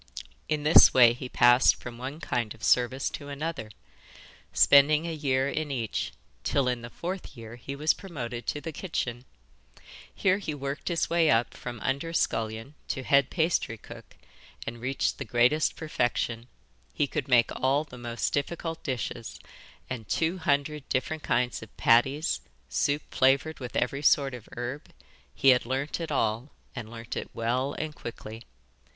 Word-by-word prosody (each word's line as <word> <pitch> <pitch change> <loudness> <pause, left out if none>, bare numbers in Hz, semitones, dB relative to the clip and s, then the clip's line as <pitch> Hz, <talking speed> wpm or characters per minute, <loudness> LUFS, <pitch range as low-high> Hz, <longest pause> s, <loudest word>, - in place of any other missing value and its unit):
In 150 -1 0
this 155 +2 +8
way 120 -2 +8
he 125 +1 -7
passed 120 +1 +5
from 120 -1 -9
one 135 +5 -6
kind 120 -8 -2
of 110 - -18
service 125 +2 +2
to 145 - -7
another, 145 -5 -4 0.8
spending 150 +3 +6
a 170 - -3
year 135 -3 +1
in 150 +1 -2
each, 120 -6 -2 0.3
till 140 -3 +1
in 125 -1 -1
the 120 - -8
fourth 175 -1 -6
year 115 0 -9
he 135 +3 -7
was 150 +2 +2
promoted 125 -10 -6
to 150 - -1
the 165 +2 -6
kitchen. 130 -8 -4 0.9
Here 195 0 +1
he 155 -7 -4
worked 140 +1 -5
his 170 -2 0
way 170 -2 +3
up 115 +1 +2
from 120 -2 -7
under 140 +5 -2
scullion 115 -1 -1
to 130 - -3
head 140 0 +4
pastrycook, 160 - -2 0.5
and 115 0 -6
reached 135 +2 -1
the - - -2
greatest 125 +6 +2
perfection. 120 -5 -2 0.5
He - - +2
could 140 0 -3
make 120 -3 +4
all 135 +3 +2
the 125 -5 -12
most 120 0 -2
difficult 165 +3 -2
dishes, 120 -2 -4 0.5
and 115 -5 -6
two 170 +3 0
hundred 145 -1 -1
different 150 +4 -1
kinds 125 -3 0
of 110 - -13
patties, 135 +4 +3 0.3
soup 145 - 0
flavoured 140 +4 +2
with 125 -3 -7
every 140 -1 0
sort 140 -2 +3
of 120 -3 -10
herb 125 +4 -5 0.4
he 135 - +4
had 125 -1 +5
learnt 135 +5 -2
it 165 - -4
all, 115 0 0 0.3
and 115 -4 -6
learnt 115 0 -7
it - - -4
well 125 +5 0
and 155 -1 -4
quickly. 115 -4 -8
135 Hz, 160 wpm, -28 LUFS, 120-150 Hz, 0.9 s, this